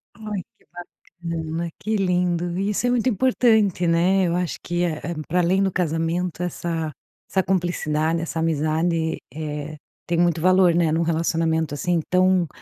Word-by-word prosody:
Ai, 210 -3 -5 0.2
que - - -30 0.6
bacana, 165 +1 -3
que 215 +1 -1
lindo. 180 -2 0
Isso 210 +5 0
é - - +2
muito 245 +1 +2
importante, 220 -6 +2
né? 180 +3 +3
Eu 170 - 0
acho 180 -3 -2
que 175 +1 -1
é, 160 -3 -1 0.2
hum, 155 - -3
pra 180 +3 +1
além 185 +3 +2
do 190 -1 +1
casamento 170 +1 -1
essa 165 -2 -3 0.4
essa 190 -1 +1
cumplicidade, 165 -3 0
essa 165 0 -4
amizade, 160 +1 0 0.2
eh, 150 0 -5 0.3
tem 170 - 0
muito 170 -1 +2
valor, 185 0 +4
né, 165 -2 +2
num 165 - +1
relacionamento 160 -1 0
assim 175 +3 0
tão 185 -1 +3
170 Hz, 155 wpm, -23 LUFS, 160-185 Hz, 0.6 s, valor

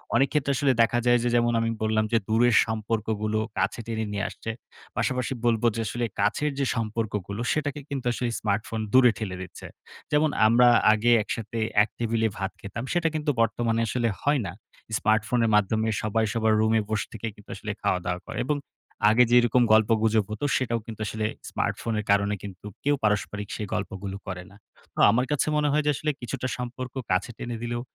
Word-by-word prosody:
অনেকক্ষেত্রে 140 +1 +2
আসলে 135 +1 +2
দেখা 120 +1 +3
যায় 120 0 +5
যে 120 - +1
যেমন 120 0 +3
আমি 115 0 0
বললাম 110 0 +1
যে, 115 - +4
"দূরের 115 +1 +4
সম্পর্কগুলো 110 -1 -1 0.2
কাছে 95 +5 0
টেনে 110 -1 -2
নিয়ে 105 +1 -2
আসছে।" 115 - -6 0.5
পাশাপাশি 125 0 0
বলবো 115 -1 +2
যে, 115 - -1
"আসলে 120 +4 -2
কাছের 150 0 +1
যে 140 - +1
সম্পর্কগুলো 110 -2 -3
সেটাকে 145 -1 -2
কিন্তু 135 -3 -4
আসলে 120 0 -2
স্মার্টফোন 105 +2 -2
দূরে 130 -2 +7
ঠেলে 95 -5 -4
দিচ্ছে।" 95 - -9 0.4
যেমন 150 +1 +3 0.2
আমরা 120 +2 +5 0.3
আগে 115 +3 +2
একসাথে 115 +1 -5 0.3
এক 110 - -4
টেবিলে 115 -1 +1
ভাত 95 +1 -2
খেতাম। 105 +3 -6
সেটা 175 -2 +2
কিন্তু 150 -1 0
বর্তমানে 115 0 +1
আসলে 120 0 0
হয় 145 0 +2
না। 85 - -4 0.5
স্মার্টফোনের 110 +2 +2
মাধ্যমে 110 +2 +2
সবাই 110 +1 +1
সবার 110 -1 +2
রুমে 110 0 +3
বসে 110 -1 -1
থেকে 115 0 -5
কিন্তু 105 - -18
আসলে - - -5
খাওয়া-দাওয়া 90 0 -1
করে - - -5
এবং 150 0 +1 0.5
আগে 115 +3 +6
যেরকম 120 0 +5
গল্পগুজব 110 0 +3
হতো, 110 +7 -3
সেটাও 120 -2 -1
কিন্তু 110 -1 -8
আসলে 110 +1 -2 0.2
স্মার্টফোনের 110 -2 -2
কারণে 100 +1 +2
কিন্তু 100 -1 -9 0.2
কেউ 145 +1 +3
পারস্পরিক 105 -1 0
সেই 105 - -4
গল্পগুলো 95 0 -4
করে 90 -1 -5
না। - - -16 0.4
আ - - +4
আমার 125 +3 +2
কাছে 150 - +1
মনে 150 0 +2
হয় 150 +1 +2
যে, 150 - +4
আসলে 150 +3 -1
কিছুটা 130 +1 -3
সম্পর্ক 125 +1 -6 0.2
কাছে 90 +6 +1
টেনে 120 -1 -5
দিলেও 120 0 -2
115 Hz, 180 wpm, -26 LUFS, 105-125 Hz, 0.5 s, দূরে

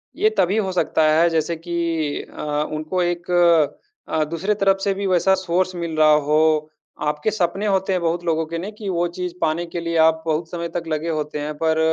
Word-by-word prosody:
ये 430 - +3
तभी 190 +5 +2
हो 190 -3 0
सकता 175 -3 +1
है, 170 +2 +4
जैसे 165 +1 0
कि 165 -3 -2
अ, - - -5 0.3
उनको 155 +4 -2
एक 175 0 -2 0.8
अ, 155 -1 +1
दूसरे 170 +7 -1
तरफ 195 -1 +2
से 200 - +1
भी 195 0 -3
वैसा 190 +1 +3
सोर्स 185 0 -1
मिल 170 -2 -4
रहा 155 0 +6 0.2
हो। 155 0 +3 0.3
आपके 150 +7 -1
सपने 195 0 -1
होते 190 -1 +1
हैं, 180 - 0
बहुत 170 +1 -1
लोगों 160 -1 +1
के 165 +1 -5
नहीं, 195 +5 -5
कि 210 -2 -7
वो 175 -1 0
चीज़ 180 -1 -3
पाने 165 +2 0
के 170 0 -5
लिए 170 0 -3
आप 160 0 +4
बहुत 160 +1 -1
समय 170 -1 -3
तक 170 0 -4
लगे 155 +1 -2
होते 150 -1 -3
हैं, 150 +1 -3
पर 160 -1 +1
170 Hz, 210 wpm, -21 LUFS, 160-185 Hz, 0.8 s, रहा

